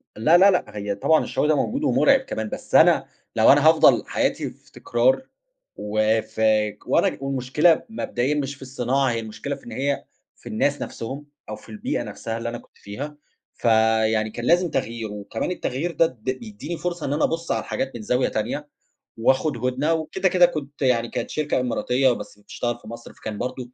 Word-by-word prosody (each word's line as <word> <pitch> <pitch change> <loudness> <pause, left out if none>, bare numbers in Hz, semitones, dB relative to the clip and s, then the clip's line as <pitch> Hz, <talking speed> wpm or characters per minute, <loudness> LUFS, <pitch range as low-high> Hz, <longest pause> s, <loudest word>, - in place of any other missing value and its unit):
لا، 155 +11 +5
لا، 195 +2 +7
لأ، 180 - +2
هي 100 0 -2
طبعًا 160 +8 +3
الشغل - - -1
ده 155 - +4
موجود 260 - -1
ومُرعِب 275 -1 +4
كمان، 110 - -5
بس - - -5
أنا - - +6 0.3
لو - - +6
أنا - - +5
هافضل - - +5
حياتي - - -1
في - - -21
تكرار، 120 - +1 0.5
وفاك 110 0 0
وأنا - - +2
والمشكلة 135 +5 +2
مبدئيًا 145 - -1
مش 140 -1 -2
في 135 - -22
الصناعة، 130 +1 0
هي 115 - -1
المشكلة 115 +6 -5
في 140 - -17
إن - - -9
هي 140 +1 -2 0.3
في - - -12
الناس 145 +6 0
نَفْسهم 135 +6 -6 0.2
أو 110 - -4
في 110 - -16
البيئة 105 - -3
نَفْسها 115 0 -5
اللي 115 0 -3
أنا 120 - -5
كنت - - -19
فيها 145 +9 -7 0.4
فيعني 110 -1 +2
كان 120 +2 -6
لازم 175 +2 +3
تغيير 115 -5 -3
وكمان 105 - -4
التغيير 165 0 -2
ده 165 - +3
د 125 -8 -7 0.2
بيدّيني 120 +9 -7
فرصة 175 -2 -3
إن 140 - -1
أنا 150 - 0
أبُص 165 0 -1
على - - +1
الحاجات 135 -1 -3
من 120 - -6
زاوية 125 +4 +1
تانية، 125 +7 -3 0.5
وأخد 130 +4 +2
هُدنة 135 +6 +1
وكده 160 +4 0
كده 180 -1 +6
كنت 150 -4 -5
يعني 120 -3 +2
كانت - - -4
شركة 150 -3 -1
إماراتية 125 +1 +1
بس 115 - -6
بتشتغل 120 +3 -4
في 110 - -15
مصر، 115 +1 -9
فكان 110 -1 -7
برضه 125 +1 -5
130 Hz, 185 wpm, -23 LUFS, 110-150 Hz, 0.5 s, لا